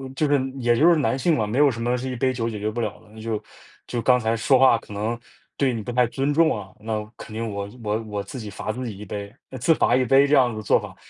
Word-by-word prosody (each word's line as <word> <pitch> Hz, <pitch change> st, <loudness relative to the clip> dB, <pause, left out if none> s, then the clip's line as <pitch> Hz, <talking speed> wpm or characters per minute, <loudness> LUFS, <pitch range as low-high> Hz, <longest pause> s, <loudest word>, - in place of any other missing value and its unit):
就 150 Hz, -, +1 dB
是 145 Hz, -1 st, +3 dB, 0.2 s
也 120 Hz, -1 st, +3 dB
就 165 Hz, -, +5 dB
是 170 Hz, -, +6 dB
男 135 Hz, -3 st, +1 dB
性 160 Hz, +4 st, +2 dB
嘛， 110 Hz, -5 st, 0 dB
没 110 Hz, +4 st, -2 dB
有 145 Hz, 0 st, +6 dB
什 115 Hz, 0 st, -6 dB
么 120 Hz, +1 st, 0 dB
是 130 Hz, +1 st, -4 dB
一 -, -, -4 dB
杯 130 Hz, +2 st, +1 dB
酒 115 Hz, -2 st, -2 dB
解 105 Hz, -2 st, -5 dB
决 105 Hz, -, -1 dB
不 110 Hz, +2 st, -5 dB
了 115 Hz, -, -3 dB
的。 105 Hz, -, -21 dB
那 110 Hz, -, -14 dB
就 110 Hz, -1 st, -3 dB, 0.5 s
就 120 Hz, -, -3 dB
“刚 125 Hz, -1 st, +4 dB
才 110 Hz, -1 st, 0 dB
说 130 Hz, +4 st, +4 dB
话 130 Hz, -3 st, +6 dB
可 105 Hz, -, -12 dB
能， 110 Hz, +3 st, -2 dB, 0.4 s
对 135 Hz, -3 st, +2 dB
你 115 Hz, -, -3 dB
不 115 Hz, -, -5 dB
太 125 Hz, 0 st, +3 dB
尊 135 Hz, +4 st, -1 dB
重 160 Hz, -2 st, +4 dB
啊， 100 Hz, -2 st, -8 dB
那 110 Hz, 0 st, -3 dB
肯 110 Hz, -, -10 dB
定， 115 Hz, +1 st, -3 dB
我 100 Hz, -1 st, -4 dB, 0.2 s
我 105 Hz, +1 st, 0 dB
我 105 Hz, -2 st, -4 dB
自 130 Hz, -, -8 dB
己 105 Hz, -2 st, -7 dB
罚 110 Hz, -, -4 dB
自 125 Hz, +3 st, -5 dB
己 110 Hz, -4 st, -5 dB
一 105 Hz, -, -8 dB
杯“， 100 Hz, +1 st, -6 dB, 0.3 s
自 165 Hz, -, +4 dB
罚 125 Hz, -, +2 dB
一 130 Hz, 0 st, +2 dB
杯 135 Hz, +3 st, +5 dB
这 150 Hz, -, +4 dB
样 125 Hz, -3 st, +4 dB
子 110 Hz, -, -7 dB
的 110 Hz, -, -4 dB
做 -, -, +3 dB
法。 -, -, -9 dB
115 Hz, 325 characters per minute, -23 LUFS, 110-130 Hz, 0.5 s, 是